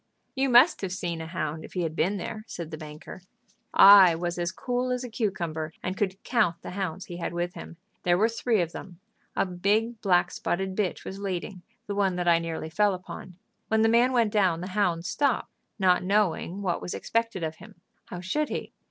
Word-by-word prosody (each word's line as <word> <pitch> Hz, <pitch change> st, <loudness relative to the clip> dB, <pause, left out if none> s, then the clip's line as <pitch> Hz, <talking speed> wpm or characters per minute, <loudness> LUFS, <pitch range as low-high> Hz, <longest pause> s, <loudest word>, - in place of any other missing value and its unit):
"You 270 Hz, 0 st, +1 dB
must 250 Hz, +7 st, +6 dB
have 190 Hz, -2 st, -3 dB
seen 175 Hz, -3 st, -3 dB
a 160 Hz, -, -6 dB
hound 160 Hz, -2 st, -4 dB
if -, -, -11 dB
he 180 Hz, -, -1 dB
had 160 Hz, -1 st, -3 dB
been 195 Hz, +6 st, +1 dB
there," 215 Hz, +4 st, -6 dB
said 170 Hz, -5 st, -7 dB
the 155 Hz, -, -5 dB
banker. 155 Hz, +4 st, -10 dB, 0.5 s
"I 195 Hz, -4 st, +9 dB
was 175 Hz, +1 st, -3 dB
as 175 Hz, 0 st, -1 dB
cool 250 Hz, +3 st, -2 dB
as 250 Hz, 0 st, -1 dB
a 250 Hz, -, -6 dB
cucumber, 170 Hz, -8 st, -3 dB
and 185 Hz, -, -2 dB
could 190 Hz, -1 st, -1 dB
count 215 Hz, -9 st, +1 dB
the -, -, -6 dB
hounds 185 Hz, -2 st, -4 dB
he 175 Hz, -, -8 dB
had 170 Hz, 0 st, -4 dB
with 175 Hz, +1 st, -2 dB
him. 165 Hz, -, -10 dB, 0.2 s
There 175 Hz, 0 st, +3 dB
were 215 Hz, +4 st, +4 dB
three 230 Hz, -2 st, 0 dB
of 170 Hz, -1 st, -2 dB
them. 175 Hz, -2 st, -10 dB, 0.4 s
A -, -, +2 dB
big 210 Hz, +5 st, 0 dB
black 180 Hz, -3 st, +3 dB
spotted 190 Hz, +1 st, -2 dB
bitch 195 Hz, -3 st, -2 dB
was 195 Hz, -, -6 dB
leading, 185 Hz, -1 st, -4 dB, 0.2 s
the 205 Hz, -, -4 dB
one 195 Hz, -2 st, +1 dB
that 180 Hz, -1 st, -2 dB
I 170 Hz, -1 st, +5 dB
nearly 165 Hz, -1 st, -5 dB
fell 205 Hz, +2 st, +2 dB
upon. 180 Hz, 0 st, -9 dB, 0.3 s
When 220 Hz, 0 st, +2 dB
the 225 Hz, -, +4 dB
man 240 Hz, +3 st, +4 dB
went 235 Hz, -4 st, +2 dB
down 185 Hz, -6 st, +2 dB
the 185 Hz, -, -5 dB
hound 180 Hz, -5 st, +1 dB
stopped, 280 Hz, +5 st, 0 dB, 0.3 s
not 185 Hz, -3 st, +3 dB
knowing 195 Hz, -1 st, 0 dB
what 175 Hz, -3 st, -1 dB
was -, -, -4 dB
expected 230 Hz, -5 st, -1 dB
of 160 Hz, 0 st, -3 dB
him. 205 Hz, +1 st, -14 dB, 0.3 s
How 180 Hz, -, -7 dB
should 295 Hz, +12 st, -1 dB
he? -, -, -5 dB
185 Hz, 215 wpm, -27 LUFS, 175-215 Hz, 0.5 s, I